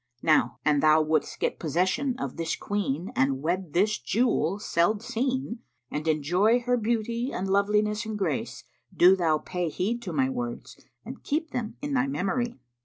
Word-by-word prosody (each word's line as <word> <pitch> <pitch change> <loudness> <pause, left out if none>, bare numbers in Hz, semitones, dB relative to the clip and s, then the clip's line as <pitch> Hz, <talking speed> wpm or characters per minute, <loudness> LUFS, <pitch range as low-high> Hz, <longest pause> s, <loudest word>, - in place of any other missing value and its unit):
Now 135 -7 +3
an 150 -1 +3
thou 155 +1 +5
wouldst 155 -1 -1
get - - -1
possession 190 - 0
of 135 -2 -4
this 165 -1 -2
queen 185 -5 -2
and 135 +1 +1
wed 175 -1 -2
this 210 +4 +2
jewel 200 -5 +1
seld 205 +2 +1
seen 255 0 -2 0.3
and 150 +2 -3
enjoy 180 - +2
her 245 +1 +1
beauty 235 +2 -1
and 190 - -3
loveliness 210 +2 +2
and 215 -1 -3
grace, 175 -8 -2 0.3
do 180 +2 +6
thou 165 -4 +2
pay 180 +2 -3
heed 220 +9 -2
to - - -5
my 265 -1 +1
words 245 -2 -5 0.2
and - - -8
keep 310 +2 -2
them 235 -3 -4
in 290 0 -2
thy 255 0 +2
memory. 240 -1 -1
200 Hz, 170 wpm, -27 LUFS, 165-240 Hz, 0.3 s, do